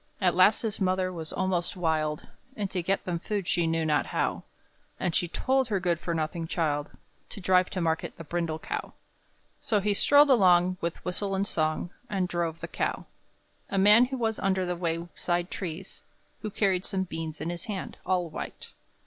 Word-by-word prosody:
At 180 -3 +3
last 185 +6 +5
his 215 -2 -3
mother 185 0 +1
was 160 -2 -5
almost 185 -1 0
wild, 155 -3 0 0.3
And 200 -2 -3
to 180 - -1
get 190 +3 -1
them 175 -2 -2
food 200 0 -3
she 175 -2 +2
knew 165 0 0
not 150 -3 +2
how; - - -1 0.6
And 180 -3 0
she 175 - +1
told 260 +8 +1
her 205 -4 0
good 175 -3 0
for 170 -1 -2
nothing 160 +1 -2
child 150 -3 -1 0.4
To - - -7
drive 185 -1 +3
to 185 - -3
market 160 -1 -1
the 165 - -7
brindle 165 0 -2
cow. - - -5 0.7
So 215 -4 +1
he 205 +1 +1
strolled 285 +7 +6
along, 185 -5 +5
with 170 0 -4
whistle 195 +2 -1
and 195 +1 +1
song, 155 -1 -1 0.2
And 190 -4 0
drove 170 -2 -2
the - - -4
cow. - - -2 0.6
A 195 - -1
man 210 +6 +7
was 225 -4 -1
under 190 -1 +1
the 180 0 -1
wayside 175 +1 -2
trees, 180 0 -6 0.4
Who 215 - -3
carried 195 -3 +1
some 190 -2 0
beans 160 -3 -5
in 170 - -2
his 175 -1 -5
hand 200 -4 -5
all 180 -1 +1
white. 155 - -7
180 Hz, 185 wpm, -28 LUFS, 165-195 Hz, 0.7 s, man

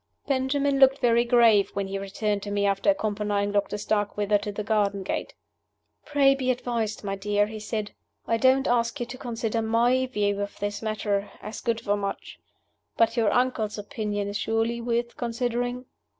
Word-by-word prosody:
Benjamin 275 +1 +1
looked 270 0 +6
very 235 -2 +3
grave 235 -4 +5
when 200 0 -1
he 195 0 -4
returned 200 +1 -2
to 205 - -6
me 205 0 0
after 195 +7 +2
accompanying 205 -6 0
Doctor 205 0 0
Starkweather 205 0 0
to 205 0 -4
the 210 +1 -4
garden 200 -2 0
gate. - - -4 0.7
"Pray 280 -2 +4
be 265 -2 -2
advised, 235 -4 -2
my 195 -1 -2
dear," 205 +1 +1
he 215 +1 -7
said. 215 0 -4 0.3
"I 230 - +1
don't 260 +2 +3
ask 240 +3 +1
you 240 - -2
to 255 - -8
consider 230 -2 -2
my 240 +4 +2
view 205 -4 0
of 200 - -5
this 205 0 -3
matter, 210 -2 -1
as 215 - -7
good 230 -2 -1
for 205 0 0
much. 200 -1 -5 0.6
But 230 - +3
your 225 -4 +2
uncle's 245 -4 0
opinion 205 0 -3
is 205 0 -3
surely 225 +2 -1
worth 235 0 -2
considering?" 245 +1 -2
220 Hz, 175 wpm, -26 LUFS, 205-245 Hz, 0.7 s, looked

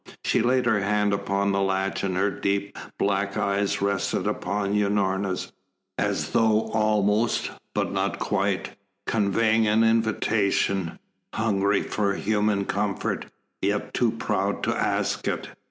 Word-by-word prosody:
She - - +2
laid 125 +2 +2
her 110 -4 +3
hand 105 +1 +1
upon 100 0 0
the 100 0 +1
latch 95 0 0
and 95 -2 -1
her 100 +2 +2
deep 100 +1 -2 0.2
black 100 0 0
eyes 100 0 0
rested 100 -2 0
upon 100 0 -1
Unorna's, 100 -2 0 0.4
as - - -1
though 110 -1 +2
almost, 110 +1 +1 0.2
but - - 0
not - - -1
quite, 100 0 -1 0.3
conveying 110 +1 +2
an 110 +2 +4
invitation, 105 -5 +1 0.4
hungry 100 -2 +1
for 100 -2 -1
human 105 -1 +1
comfort, 100 0 -2 0.3
yet 100 +1 -1
too 120 - +2
proud 115 - -1
to - - +1
ask - - -1
it. - - -2
100 Hz, 130 wpm, -25 LUFS, 100-110 Hz, 0.4 s, an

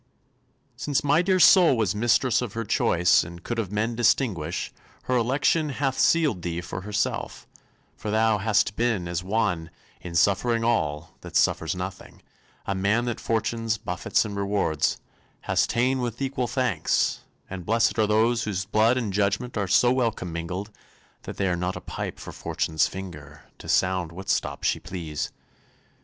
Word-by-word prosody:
Since 145 -2 -1
my 145 +3 +4
dear 185 +1 +2
soul 175 -7 +7
was 105 -5 +1
mistress 120 +3 +2
of 120 -4 -4
her 115 0 -3
choice 90 -2 +3
And 85 0 -10
could 120 -1 -3
of 100 -4 -3
men 110 +3 -1
distinguish, 110 - 0 0.3
her 130 - -1
election 140 +6 +2
Hath 135 -1 -1
sealed 150 - +3
thee 85 -1 -3
for 90 +1 -6
herself; 105 +2 -3 0.5
for 105 - -6
thou 110 0 +2
hast 105 0 +1
been 115 -7 0
As 85 +1 -3
one, 90 -5 -1 0.3
in 85 -1 -7
suffering 115 +6 +2
all, 80 -9 -1
that - - -10
suffers - - +2
nothing, 90 +1 -7 0.4
A 100 - -1
man 100 +5 +1
that 120 -2 -3
fortune's 115 0 -1
buffets 90 +3 -1
and 105 -1 -5
rewards 100 -6 0 0.4
Hast - - +1
ta'en 130 +3 +1
with 120 -2 -3
equal 135 -2 -2
thanks; 125 - 0 0.3
and 95 -2 -7
bless'd 115 +4 +1
are 110 - +3
those 115 +2 +2
Whose 95 -3 -2
blood 110 +4 +3
and 110 -6 -2
judgment 100 +5 0
are 100 -3 -1
so 120 +6 +4
well 125 -3 +2
commingled 90 +2 -5 0.5
That - - -7
they 95 - 0
are 90 - +1
not 90 +1 -2
a - - -5
pipe - - -5
for - - -9
fortune's 80 -1 -1
finger 75 -7 -9 0.2
To - - -10
sound 90 -3 +1
what 95 +3 -9
stop - - -1
she - - +1
please. 80 -5 -5
105 Hz, 165 wpm, -25 LUFS, 90-120 Hz, 0.5 s, soul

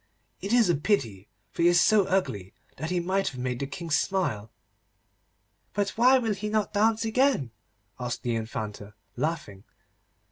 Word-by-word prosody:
It 200 - -4
is 240 -3 +5
a 175 - +3
pity, 120 - -1 0.2
for - - -4
he 170 - +5
is 175 0 +5
so 210 +1 +4
ugly 145 - -1 0.2
that 160 +4 -4
he 180 0 0
might 190 +3 0
have 130 - -4
made 125 -1 -2
the 140 - -3
King 170 +2 -7
smile.' 145 - 0 1.3
'But 205 0 +1
why 255 +3 +5
will 225 -4 0
he 210 +2 -4
not 215 -1 -1
dance 220 +2 +2
again?' 225 - +1 0.5
asked 125 -1 -4
the 120 - -1
Infanta, 110 -2 -5 0.2
laughing. 135 -9 -3
175 Hz, 165 wpm, -27 LUFS, -, 1.3 s, is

